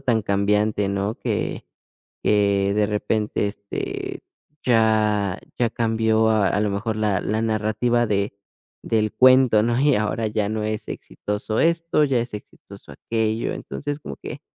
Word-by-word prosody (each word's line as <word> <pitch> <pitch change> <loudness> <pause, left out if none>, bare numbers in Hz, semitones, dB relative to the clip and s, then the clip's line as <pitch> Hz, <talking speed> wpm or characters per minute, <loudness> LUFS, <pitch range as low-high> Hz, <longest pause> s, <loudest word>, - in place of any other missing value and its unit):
tan 120 -5 +1
cambiante, 105 +1 +1
¿no? 100 +2 -1
Que, - - -2 0.6
eh, 100 -1 +2
de 105 0 +3
repente, 105 0 -1
este, 100 0 -5 0.4
ya 110 -4 +2 0.2
ya 120 -2 +2
cambió 110 -1 +2
a 105 -2 +2
lo 105 0 +1
mejor 105 +3 -2
la 105 -3 +1
la 110 +2 -1
narrativa 115 +2 +1
de 100 -2 -1 0.5
del 110 -2 0
cuento, 130 -4 +5
¿no? 120 +2 +1
Y 145 0 +4
ahora 110 +2 -1
ya 105 -1 -1
no 110 0 -2
es 110 0 -3
exitoso 105 - -4
esto, 165 -1 +2
ya 135 -3 +2
es 120 0 -4
exitoso 105 - -11
aquello. 110 0 -2
Entonces, 145 0 -5
como 70 - -8
que, - - -8
110 Hz, 145 wpm, -23 LUFS, 105-115 Hz, 0.6 s, cuento